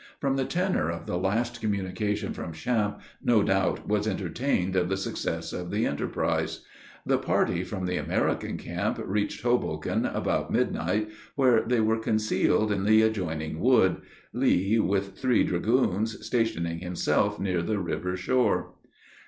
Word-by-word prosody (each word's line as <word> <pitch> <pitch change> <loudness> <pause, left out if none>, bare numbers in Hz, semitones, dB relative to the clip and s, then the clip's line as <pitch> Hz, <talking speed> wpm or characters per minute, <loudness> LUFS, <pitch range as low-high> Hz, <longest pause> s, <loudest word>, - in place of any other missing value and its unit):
From 135 -1 0
the 135 -1 0
tenor 180 - 0
of 85 0 -5
the - - -3
last 115 +6 -1
communication 105 0 -1
from 80 - -6
Champe, 105 +4 -1 0.2
no 115 -4 +4
doubt 95 -1 0
was 105 0 +1
entertained 95 - -1
of 90 -1 +2
the 95 - 0
success 80 -3 -3
of 90 -1 -5
the 105 +4 0
enterprise. 70 - -1 0.4
The - - +2
party 90 0 +1
from 95 0 -4
the 90 0 -1
American - - -1
camp - - -2
reached 105 +2 -2
Hoboken 120 0 0
about - - -1
midnight, 105 +7 0 0.3
where 130 -5 +4
they 120 0 +1
were 110 +1 +2
concealed 110 -1 +1
in 100 -2 0
the 110 +1 +6
adjoining 80 -8 -1
wood 120 -3 +4 0.4
Lee, 100 +5 +2
with 100 -2 0
three 125 -3 +3
dragoons, 110 +2 0
stationing 85 -9 0
himself 90 0 0
near 90 -3 0
the 105 +5 -1
river 90 0 -2
shore. 125 +7 +1
100 Hz, 145 wpm, -27 LUFS, 90-110 Hz, 0.4 s, the